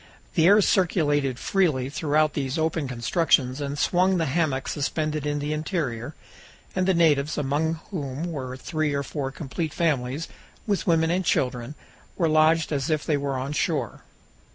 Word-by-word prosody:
The 165 -2 +4
air 205 +2 +7
circulated 145 - +2
freely 155 -7 +1
throughout 150 +1 +1
these 135 0 -2
open 160 -2 0
constructions 130 +1 +1
and 140 0 -3
swung 185 +4 +2
the 165 - +1
hammock 140 -2 0
suspended 155 +1 -2
in 145 0 -1
the 145 +1 -2
interior, 150 - -3 0.6
and 185 0 +1
the 190 - +3
natives, 150 -3 +3
among 150 +3 0 0.2
whom 145 -5 -4
were 130 -4 -5
three 155 0 -1
or 140 - -1
four 140 -1 -4
complete 155 +3 -5
families, 145 -2 0 0.4
with 205 -1 -1
women 165 -1 +3
and 185 +2 +1
children, 125 -3 -1 0.4
were 170 - +2
lodged 155 +1 +3
as 140 -1 -1
if 155 -2 0
they 155 - +1
were 140 -1 -2
on 135 +3 -3
shore. 145 - -1
150 Hz, 160 wpm, -25 LUFS, 135-165 Hz, 0.6 s, air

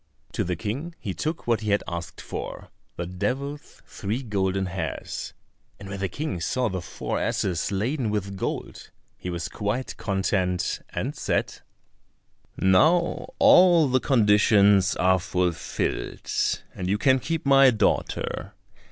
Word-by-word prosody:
To - - -1
the 90 0 -2
King 135 - -4
he 95 - -4
took 155 - -3
what 115 -2 +2
he 105 - -3
had 100 0 +2
asked 85 0 -6
for, - - -6 0.3
the 85 - -4
devil's 135 - -4
three 110 +6 -4
golden 95 -3 0
hairs, 95 +1 -5 0.5
and 100 -1 -9
when 100 0 -5
the 95 -1 -1
King 100 - -4
saw 125 +7 0
the 95 -2 -3
four 80 - -4
asses 90 -1 -1
laden 115 +5 -1
with 100 -2 -2
gold 95 - -5 0.3
he 90 - -6
was 85 -1 -3
quite 105 +6 -3
content, 95 -2 0
and - - -3
said, - - -1 1.0
"Now 155 - +3
all 175 -5 +6
the 130 +1 +3
conditions 105 -6 +4
are 95 +1 +3
fulfilled, 90 -1 -2 0.4
and 90 0 -4
you 100 - +2
can 130 +3 +3
keep 165 +4 -3
my 135 -1 +7
daughter. 115 -3 -1
105 Hz, 140 wpm, -25 LUFS, 95-130 Hz, 1.0 s, my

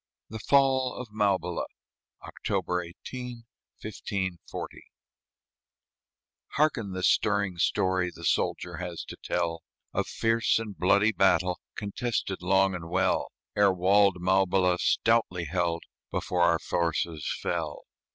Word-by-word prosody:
THE 110 - -6
FALL 130 0 +3
OF 125 -3 -7
MAUBILA 100 -5 0 0.6
[October 90 0 -2
18, 120 +7 -8 0.3
1540] 95 -4 -5 1.7
Hearken 130 -10 +1
the 95 0 -4
stirring 100 -4 +2
story 95 +1 +1
The 85 - -13
soldier 85 +2 0
has 90 -2 -5
to - - -9
tell, 85 -2 -1 0.3
Of - - 0
fierce 115 0 +2
and 110 -3 -5
bloody 100 +4 +3
battle, 90 -3 +2 0.2
Contested 105 -2 -3
long 95 +1 +3
and 85 -2 -6
well. 90 +2 +1 0.2
Ere 100 -1 +5
walled 95 +1 +4
Maubila, 90 0 +2
stoutly 115 -7 +2
held, 85 0 -1 0.3
Before 90 -1 -1
our 85 -1 +5
forces 85 -1 -1
fell. 80 -4 -3
95 Hz, 110 wpm, -28 LUFS, 90-105 Hz, 1.7 s, Ere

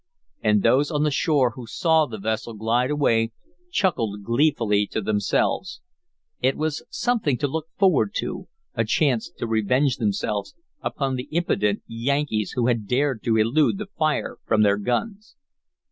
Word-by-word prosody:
And 105 -2 +2
those 130 +5 +3
on 150 -2 0
the 150 - +2
shore 135 -3 +2
who 120 +1 -10
saw 160 - +2
the 110 -3 -7
vessel 110 +2 -3
glide 115 +4 +1
away 115 -6 +1 0.4
chuckled 115 - 0
gleefully 115 -4 +2
to - - -3
themselves. 110 - 0 0.6
It 135 - +2
was 155 -1 -2
something 220 - 0
to 145 - 0
look 160 +3 -4
forward 195 +2 +3
to, - - -3 0.3
a - - 0
chance 135 - +1
to - - -3
revenge 120 +5 +1
themselves 105 -2 -2 0.3
upon 135 -2 -2
the 125 - -5
impudent 105 -11 0
Yankees 115 -2 -1
who 120 - 0
had 115 -4 0
dared 130 -1 0
to 115 -1 +2
elude 130 - +2
the 205 -1 -6
fire 155 -2 -1
from 110 -1 +2
their 100 -1 +3
guns. 200 - -3
125 Hz, 155 wpm, -24 LUFS, 110-150 Hz, 0.6 s, those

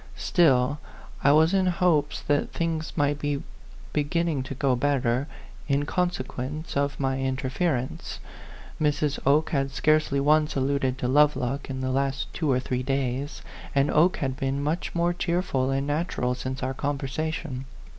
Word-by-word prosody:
Still, 145 -5 +3 0.4
I 140 - +6
was 160 +4 +5
in 190 -1 +3
hopes 170 -5 +2
that 145 0 +1
things 165 -1 -2
might 145 -1 +1
be 145 0 -2 0.5
beginning 155 0 0
to 135 +1 -6
go 135 -1 +2
better, 130 -1 +1 0.4
in 140 +1 +1
consequence 155 -3 -3
of 140 0 0
my 135 -1 0
interference. 130 +1 -2 0.6
Mrs. 150 -1 +1
Oke 150 +3 +3
had 140 -2 +1
scarcely 155 0 +2
once 150 +2 +3
alluded 135 -1 0
to 125 - -2
Lovelock 140 -1 +2
in 130 -1 -4
the 130 0 -1
last 135 0 -1
two 155 -4 -1
or 130 - +3
three 125 -1 -2
days; 135 +1 -2 0.3
and 140 +1 +3
Oke 170 +5 +4
had 130 -2 -2
been 135 +1 -2
much 160 +5 -2
more 170 +1 +2
cheer 175 0 0
ful 130 -6 0
and 135 +1 0
natural 145 -4 -1
since 130 +1 -5
our 130 +1 -1
conversation. 140 0 -3
140 Hz, 155 wpm, -26 LUFS, 130-155 Hz, 0.6 s, I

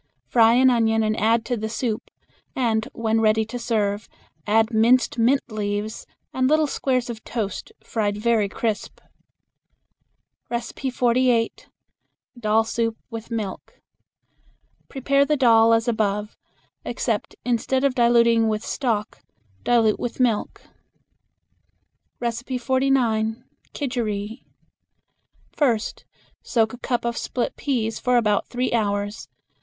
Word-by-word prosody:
Fry 230 -1 +5
an 260 +1 +5
onion 225 -2 +2
and 215 0 0
add 225 +1 +2
to 245 - -1
the 220 -1 -4
soup, 220 -1 -3 0.5
and 225 -3 0
when 225 -1 0
ready 220 0 +3
to 245 +3 -6
serve 210 -3 -1 0.4
add 225 +2 +3
minced 235 +2 +3
mint 255 +5 +3
leaves 210 0 -3 0.3
and 255 0 +1
little 310 +1 +4
squares 255 -3 -1
of 230 -2 -7
toast, 210 -5 -4
fried 205 -2 -1
very 215 -2 +1
crisp. 220 0 -3 1.5
48. 245 -1 0 0.7
Dal 220 0 +2
Soup 225 0 -2
with 225 -1 -7
Milk. 215 -5 -5 1.1
Prepare 275 +1 +2
the 300 +1 +1
dal 230 -3 +5
as 230 +1 +2
above, 210 -2 -1 0.5
except - - -2
instead 250 +2 0
of 275 -2 +2
diluting 235 -2 +4
with 215 0 -2
stock 225 -6 -2 0.4
dilute 225 -3 +3
with 245 - -4
milk. 235 -4 0 1.6
49. 240 -1 0 0.3
Kidgeri. 225 -6 -3 1.1
First 235 -7 -1 0.4
soak 225 -2 0
a 245 - -9
cup 240 -2 -2
of 235 0 -1
split 245 - -3
peas 225 -6 -2
for 250 -1 +2
about 210 -3 +1
three 250 +1 -2
hours. 205 -2 -1
230 Hz, 115 wpm, -23 LUFS, 220-245 Hz, 1.6 s, Fry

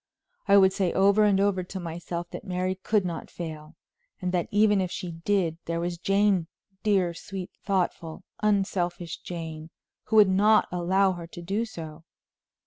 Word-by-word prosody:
I 200 0 +7
would 190 -1 +6
say 190 -3 0
over 200 +2 +4
and 200 -2 +3
over 200 -2 +2
to 190 +2 -7
myself 170 0 -5
that - - -7
Mary 185 0 -1
could 195 +1 0
not 170 -2 -5
fail, 155 -3 -8 0.4
and 180 -1 -2
that 180 -2 0
even 210 -1 +3
if 185 - -1
she 180 0 -5
did, 165 -1 -1
there 170 0 -2
was 170 0 -3
Jane, 195 -2 +2 0.3
dear, 190 -5 +2
sweet, 190 +1 -7
thoughtful, 175 -5 -2 0.2
unselfish 185 -5 0
Jane, 160 -2 -7 0.4
who 220 - -2
would 210 -2 +8
not 210 +3 +4
allow 190 +2 +2
her 175 -2 -7
to 175 +1 -10
do 200 +6 -1
so. 160 -6 -9
185 Hz, 165 wpm, -27 LUFS, 170-200 Hz, 0.4 s, would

